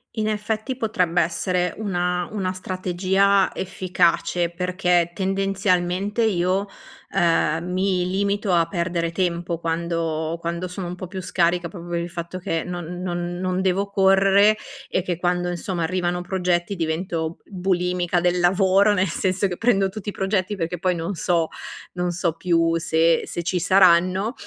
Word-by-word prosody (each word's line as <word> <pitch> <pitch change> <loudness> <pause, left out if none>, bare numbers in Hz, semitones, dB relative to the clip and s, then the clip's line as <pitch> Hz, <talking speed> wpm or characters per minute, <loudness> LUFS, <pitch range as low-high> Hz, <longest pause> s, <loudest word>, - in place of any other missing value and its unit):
In 215 -2 -1
effetti 215 +4 -2
potrebbe 180 -7 +1
essere 180 +2 -1
una 180 -4 -1
una 195 -3 -2
strategia 185 +1 +1
efficace, 175 -2 0
perché 180 -1 +1
tendenzialmente 195 +2 0
io, 190 -1 +1 0.5
ehm, 170 -1 +1
mi 185 -1 +1
limito 200 +2 0
a 170 -1 +4
perdere 170 -1 -1
tempo 170 -2 -1
quando 165 -1 -2
quando 170 +2 -3
sono 180 0 -6
un 175 - -5
po' 185 - -7
più 190 +1 -6
scarica 175 -1 +1
proprio 175 -2 -10
per 170 0 -1
il 170 - -4
fatto 170 +1 -6
che 165 -2 -2
non 175 0 -6
non 175 -1 -3
non 185 0 -1
devo 195 +2 0
correre, 195 +2 +5 0.3
e 185 - 0
che, 175 -2 -2
quando, 175 0 0
insomma, 175 0 -3
arrivano 175 +1 -1
progetti 180 0 -1
divento 165 -1 -2
b - - -25 0.2
bulimica 180 -1 +1
del 180 0 +2
lavoro, 190 +3 +4
nel 190 -1 +1
senso 185 +3 0
che 180 -2 -5
prendo 200 -5 +2
tutti 205 +1 -6
i - - -3
progetti, 195 +1 -1
perché 175 -1 -3
poi 180 +1 +1
non 170 +3 -3
so 170 -2 0 0.4
non 180 0 -1
so 175 -1 0
più 165 -1 +2
se 165 0 +2
se 175 - -4
ci 180 +1 0
saranno, 185 +3 +4
180 Hz, 155 wpm, -23 LUFS, 170-190 Hz, 0.5 s, correre